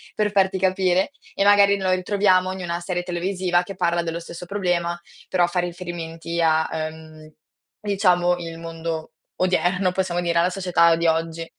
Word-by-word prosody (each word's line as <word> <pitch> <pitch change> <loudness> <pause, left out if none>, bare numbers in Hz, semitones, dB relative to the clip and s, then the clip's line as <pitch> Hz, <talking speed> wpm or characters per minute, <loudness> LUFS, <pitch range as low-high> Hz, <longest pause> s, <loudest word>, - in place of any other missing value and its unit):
per 210 -1 0
farti 195 -1 +2
capire, 185 +3 +1 0.2
e - - 0
magari 200 0 +5
lo 190 -1 0
ritroviamo 185 0 +2
in 190 - -7
i - - -5
una 170 -1 -3
serie 175 0 -3
televisiva 180 0 0
che 195 +2 -8
parla 175 -2 +1
dello 170 0 -4
stesso 170 +1 -9
problema, 175 -3 -1 0.3
però 180 -2 +2
fa 175 +1 -1
riferimenti 170 -1 -4
a, 160 -1 +2
ehm, 155 0 -7 0.5
diciamo 180 -4 +2
il 165 -1 -7
mondo 165 -1 -5 0.3
odierno, 180 +1 +1
possiamo 180 -1 -1
dire, 170 -1 +1
alla 175 +2 +3
società 180 -3 +3
di 170 0 0
oggi. 165 0 -1
175 Hz, 165 wpm, -23 LUFS, 170-185 Hz, 0.5 s, magari